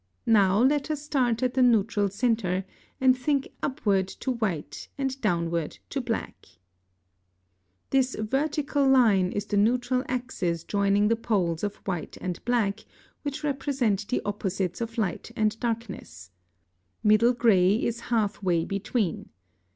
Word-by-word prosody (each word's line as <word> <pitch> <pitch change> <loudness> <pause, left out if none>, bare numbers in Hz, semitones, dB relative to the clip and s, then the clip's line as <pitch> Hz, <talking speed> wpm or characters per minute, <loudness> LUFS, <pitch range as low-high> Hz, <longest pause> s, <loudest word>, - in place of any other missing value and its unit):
Now 200 -4 +4
let 285 +2 +2
us 305 -2 -1
start 260 -5 0
at 250 -1 +1
the 260 - +2
neutral 215 -4 +3
centre, 200 -4 0 0.3
and 260 -1 +5
think 275 +2 -1
upward 200 -8 0
to 260 +6 -4
white 215 -11 -3
and 270 -1 -3
downward 170 -5 -1
to 275 - -1
black 235 -2 -4 1.4
(Fig. - - -17
9.) 270 - +6
[Illustration: 260 0 +1
Fig. 215 - -12
9.] 270 - +4
This - - -14
vertical 285 -2 +1
line 215 -9 +4
is 205 0 -3
the 205 - -1
neutral 245 +4 +2
axis 210 -10 -2
joining 200 +2 +2
the 230 - +3
poles 190 -8 -1
of 205 -1 -2
white 175 -5 -4
and 180 -2 -5
black, 225 -4 +1 0.4
which 290 +1 -5
represent 265 -8 0
the 250 - -1
opposites 195 -2 -2
of 230 +1 -4
light 215 -1 -2
and 215 +1 0
darkness. 205 - -5 0.7
Middle 215 +3 +5
gray 205 -5 +4
is 235 +1 -1
half 220 -4 0
way 175 -4 +1
between. 200 -1 -2
220 Hz, 150 wpm, -26 LUFS, 195-255 Hz, 1.4 s, 9